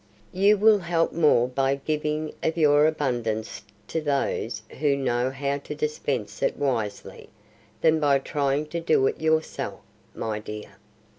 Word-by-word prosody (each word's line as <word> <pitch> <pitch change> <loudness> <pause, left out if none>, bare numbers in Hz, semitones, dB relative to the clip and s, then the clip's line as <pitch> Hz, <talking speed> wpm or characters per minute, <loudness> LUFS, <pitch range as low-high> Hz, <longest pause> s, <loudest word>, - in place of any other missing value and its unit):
"You 200 +3 +4
will 215 0 +5
help 170 -2 0
more 150 -7 +4
by 135 +1 +1
giving 150 +2 -2
of 160 +1 -1
your 150 -1 +5
abundance 120 -8 -2 0.3
to 160 - -1
those 135 -6 -1 0.2
who 145 -2 +2
know 125 -2 0
how 140 +1 -2
to - - -7
dispense 455 +2 -3
it - - 0
wisely, 115 -7 -3 0.5
than 160 0 +4
by 145 -2 +4
trying 140 +1 -1
to 170 - -3
do 165 -5 +2
it - - -1
yourself, 160 0 -1 0.4
my 110 -1 -3
dear. 105 0 -8
145 Hz, 145 wpm, -25 LUFS, 130-160 Hz, 0.5 s, will